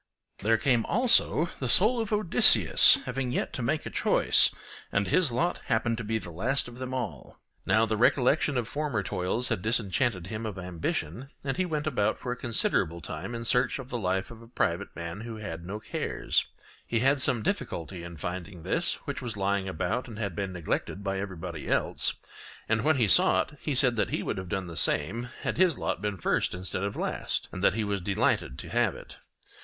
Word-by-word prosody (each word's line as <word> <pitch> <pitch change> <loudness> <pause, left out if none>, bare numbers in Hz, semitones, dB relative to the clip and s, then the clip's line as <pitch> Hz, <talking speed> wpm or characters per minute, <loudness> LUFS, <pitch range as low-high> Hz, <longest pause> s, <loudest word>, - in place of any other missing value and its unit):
There 110 +2 +2
came 125 -4 +2
also 230 - +4
the 130 - -2
soul 225 - +4
of 225 - -5
Odysseus 210 -5 +6
having 125 0 -3
yet - - -2
to - - -3
make 150 +6 -1
a - - -6
choice, - - +5 0.4
and 100 0 0
his 155 - +3
lot 165 +9 -1
happened 115 +1 0
to - - -4
be 110 +1 -1
the 90 -5 -8
last 125 +12 0
of 120 +1 -11
them 130 0 -5
all. 120 - -5 0.3
Now 110 +1 +4
the 110 -1 -2
recollection 130 +4 +2
of 120 -3 -2
former 145 -9 -2
toils 95 +6 -1
had - - -1
disenchanted 110 -3 0
him 110 +4 -6
of 100 -3 -6
ambition, 90 - -4
and 135 -1 -2
he 185 0 -1
went 150 -3 -2
about 125 -9 0
for 125 - -5
a - - -2
considerable 100 -8 0
time 85 +8 -6
in 115 0 -6
search 125 +2 +1
of 135 -2 -9
the 120 - -3
life 95 +1 -2
of 115 -1 -12
a 115 - -14
private 100 -4 -2
man 85 +4 -6
who 115 0 -7
had 100 -6 -7
no 105 +3 -5
cares; - - -1 0.4
he 115 -1 0
had 135 +2 +3
some 120 -4 +3
difficulty 85 -1 -3
in 85 -1 -9
finding 90 +2 -6
this, 165 - 0
which 140 -4 -4
was 120 -4 -5
lying 100 -1 -1
about 95 +9 -2
and 115 -3 -9
had 100 -6 -4
been 100 0 -3
neglected 90 +3 -3
by 95 -1 -2
everybody 90 -5 -6
else; - - +1 0.5
and 115 +1 +1
when 155 +2 +3
he 115 -4 +2
saw 95 - +6
it, 150 - -16
he 150 - -2
said 125 -2 +3
that 105 - 0
he - - -2
would - - -3
have 95 -1 -8
done 95 -1 -2
the 85 -1 -9
same 115 +13 +3
had - - -2
his 180 -4 +3
lot - - -3
been 105 -1 -3
first 85 - 0
instead 90 0 -2
of 100 0 -3
last, - - -2
and 90 - -6
that 100 - +4
he 110 - -1
was 100 -2 -2
delighted 90 -8 0
to - - -8
have - - +1
it. - - -12
110 Hz, 210 wpm, -28 LUFS, 95-125 Hz, 0.5 s, Odysseus